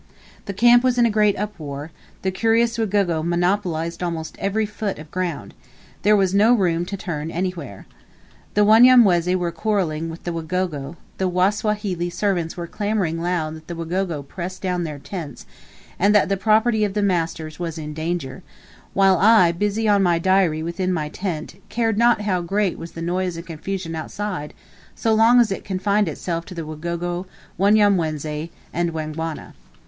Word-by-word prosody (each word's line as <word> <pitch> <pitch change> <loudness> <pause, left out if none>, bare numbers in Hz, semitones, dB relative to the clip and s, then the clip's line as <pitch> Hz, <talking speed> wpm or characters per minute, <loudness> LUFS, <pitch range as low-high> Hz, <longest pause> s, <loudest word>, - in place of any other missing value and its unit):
The 200 - -4
camp 240 +4 +5
was 255 -1 +2
in 240 - +5
a 230 - +2
great 210 -1 +3
uproar; 155 -7 -5 0.3
the 190 - 0
curious 230 +3 +1
Wagogo 195 -7 +1
monopolized 175 -1 -1
almost 165 -3 -4
every 215 +2 0
foot 205 -1 -4
of 155 0 -11
ground; 170 - -3 0.5
there 210 +2 +4
was 195 -2 +2
no 210 +4 +5
room 175 -5 +1
to 200 - -4
turn 160 -4 -4
anywhere. 170 - -4 0.7
The 210 0 +5
Wanyamwezi 215 -6 +6
were 175 -2 -1
quarreling 165 -4 -1
with 165 +1 -9
the 175 - -3
Wagogo, 165 -3 -3 0.2
the 190 -1 +1
Wasawahili 190 -1 0
servants 180 -3 -1
were 170 - -4
clamoring 195 -4 -2
loud 170 -3 -1
that 160 0 -12
the 175 - -5
Wagogo 165 -2 -2
pressed 185 +4 -6
down 180 -2 -1
their 150 -2 -5
tents, 150 0 -7 0.5
and 205 +3 +4
that 210 - +4
the 195 - +2
property 220 +2 +2
of 205 -1 -1
the 210 - +1
masters 165 -4 -1
was 165 -2 -4
in 150 -1 -6
danger; 155 -4 -4 0.5
while 195 -2 +4
I, 205 -4 +6
busy 210 +5 -1
on 205 -1 +4
my 175 -3 +3
diary 175 -3 +2
within 180 +3 -2
my 155 -4 -2
tent, 175 +1 -5
cared 225 -2 0
not 235 -2 +4
how 190 -4 0
great 195 +2 -1
was 165 - -8
the 165 - -6
noise 180 0 -1
and 170 - -7
confusion 170 +1 -5
outside 170 -1 -5 0.4
as - - -13
long 225 +2 +5
as 230 -4 +3
it 195 - -3
confined 200 +1 0
itself 165 +2 -3
to 180 - -10
the 165 -2 -5
Wagogo, 170 +3 -4 0.3
Wanyamwezi, 170 -7 +2 0.2
and 170 0 -1
Wangwana. 160 0 -5
180 Hz, 170 wpm, -22 LUFS, 165-205 Hz, 0.7 s, Wanyamwezi